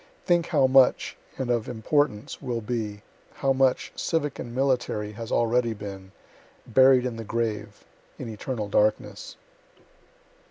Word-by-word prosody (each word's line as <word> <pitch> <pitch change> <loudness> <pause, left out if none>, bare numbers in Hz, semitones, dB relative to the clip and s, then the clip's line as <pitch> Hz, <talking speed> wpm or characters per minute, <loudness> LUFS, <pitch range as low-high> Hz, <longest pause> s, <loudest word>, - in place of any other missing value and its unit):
Think 175 -2 +2
how 135 - +3
much, 130 -1 +4 0.2
and 130 -2 -1
of 115 -2 0
importance, 120 -1 -1
will 125 -3 -2
be 105 -2 -4 0.3
how 135 -1 +1
much, 130 -1 +1
civic 150 -4 -1
and 120 0 -6
military, 125 -6 0
has 115 +1 -8
already 115 0 +2
been 95 -2 -8 0.5
buried 130 +1 +5
in 120 -3 -3
the 115 - -5
grave, 110 -2 -3 0.3
in 125 - -6
eternal 110 0 -4
darkness. 105 +1 0
120 Hz, 130 wpm, -26 LUFS, 105-130 Hz, 0.5 s, buried